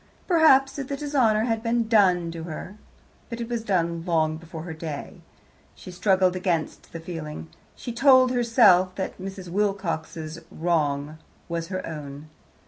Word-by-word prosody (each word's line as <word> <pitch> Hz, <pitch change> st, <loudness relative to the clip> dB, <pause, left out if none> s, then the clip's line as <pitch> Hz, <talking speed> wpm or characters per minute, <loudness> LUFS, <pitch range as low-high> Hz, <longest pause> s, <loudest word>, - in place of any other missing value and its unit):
Perhaps, 285 Hz, -6 st, +4 dB
if 270 Hz, -, -4 dB
the 280 Hz, -, -3 dB
dishonour 255 Hz, -7 st, +2 dB
had 225 Hz, -2 st, -1 dB
been 230 Hz, 0 st, 0 dB
done 180 Hz, -6 st, +3 dB
to 165 Hz, 0 st, -7 dB
her, 170 Hz, +4 st, -7 dB, 0.5 s
but 235 Hz, -, -6 dB
it 235 Hz, -, -4 dB
was 235 Hz, -2 st, -3 dB
done 170 Hz, -5 st, 0 dB
long 160 Hz, -3 st, +1 dB
before 165 Hz, 0 st, -9 dB
her 170 Hz, -1 st, -6 dB
day. 155 Hz, -3 st, -7 dB, 0.5 s
She 185 Hz, -, -11 dB
struggled 185 Hz, 0 st, +2 dB
against 180 Hz, -4 st, -2 dB
the 165 Hz, -, -7 dB
feeling. 160 Hz, -2 st, -7 dB, 0.3 s
She 240 Hz, -, -6 dB
told 260 Hz, 0 st, +5 dB
herself 225 Hz, -7 st, +4 dB
that 190 Hz, -1 st, -5 dB
Mrs. 190 Hz, -1 st, -7 dB
Wilcox's 170 Hz, -5 st, -2 dB
wrong 155 Hz, -2 st, -1 dB, 0.3 s
was 170 Hz, -1 st, -3 dB
her 185 Hz, 0 st, -4 dB
own. 150 Hz, -1 st, -8 dB
185 Hz, 150 wpm, -25 LUFS, 165-230 Hz, 0.5 s, told